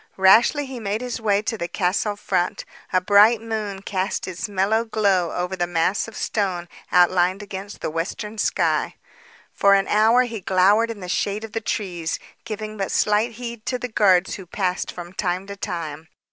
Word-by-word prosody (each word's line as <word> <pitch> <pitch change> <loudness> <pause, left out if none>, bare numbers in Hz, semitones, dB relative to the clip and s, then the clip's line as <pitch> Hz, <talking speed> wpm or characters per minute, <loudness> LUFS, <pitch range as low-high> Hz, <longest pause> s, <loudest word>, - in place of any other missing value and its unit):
Rashly 225 +10 +5
he 260 -2 -7
made 210 +1 -2
his 245 -2 -4
way 205 -1 +2
to 225 -1 -3
the 170 - -2
castle 190 +3 0
front. 180 -3 -1 0.3
A 185 - +4
bright 205 +4 +5
moon 215 -3 -4
cast 190 0 -2
its 185 +4 -4
mellow 205 +3 +1
glow 200 -6 +1
over 180 +1 -2
the 175 -1 -1
mass 175 +4 0
of 225 - -11
stone 185 -5 -2 0.2
outlined 180 +2 +3
against 200 0 -8
the - - -2
western 210 +6 -4
sky. - - +1 0.6
For 200 0 +5
an 195 - +1
hour 225 +4 +4
he 230 -4 -5
glowered 195 +5 +3
in 220 -3 -6
the 180 - -6
shade 200 +3 -1
of 225 - -7
the 225 - -3
trees, 180 -6 -3 0.3
giving 215 0 -5
but 195 -1 -2
slight 215 +3 +2
heed 235 -1 -7
to 250 - 0
the 250 0 -5
guards 190 -4 +3
who 190 -3 -8
passed 185 0 -2
from 175 0 -9
time 185 -1 -2
to 200 0 -7
time. 165 -6 -5
200 Hz, 185 wpm, -23 LUFS, 180-220 Hz, 0.6 s, Rashly